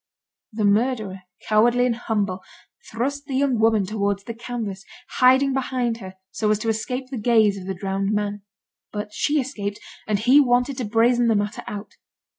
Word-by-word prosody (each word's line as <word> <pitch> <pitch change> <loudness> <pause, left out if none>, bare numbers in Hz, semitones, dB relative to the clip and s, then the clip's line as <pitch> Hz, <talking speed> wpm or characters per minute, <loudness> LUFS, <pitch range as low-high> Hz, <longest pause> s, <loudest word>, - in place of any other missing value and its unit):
The 215 -1 -1
murderer, 210 -2 +1 0.3
cowardly 240 +3 +4
and 240 -2 +1
humble, 205 -5 -2 0.5
thrust 280 +5 -3
the 270 - -3
young 265 -3 +1
woman 220 -3 +3
towards 200 -1 -1
the 230 - -6
canvas, 225 -5 -5 0.3
hiding 260 +2 +5
behind 250 -3 -1
her, 190 -4 -10 0.2
so 210 +2 -1
as 215 - +3
to 225 +2 -3
escape 250 +4 -3
the 255 - -3
gaze 220 -3 +4
of 190 -1 -8
the 190 - -3
drowned 195 +1 -2
man. 205 -1 -2 0.5
But 210 0 -5
she 300 0 +1
escaped, 210 -7 -4 0.3
and 210 -1 +1
he 250 +7 +5
wanted 250 0 +2
to 245 - -2
brazen 235 +3 +3
the 225 - +3
matter 205 +1 -1
out. 205 0 -7
225 Hz, 175 wpm, -23 LUFS, 205-250 Hz, 0.5 s, hiding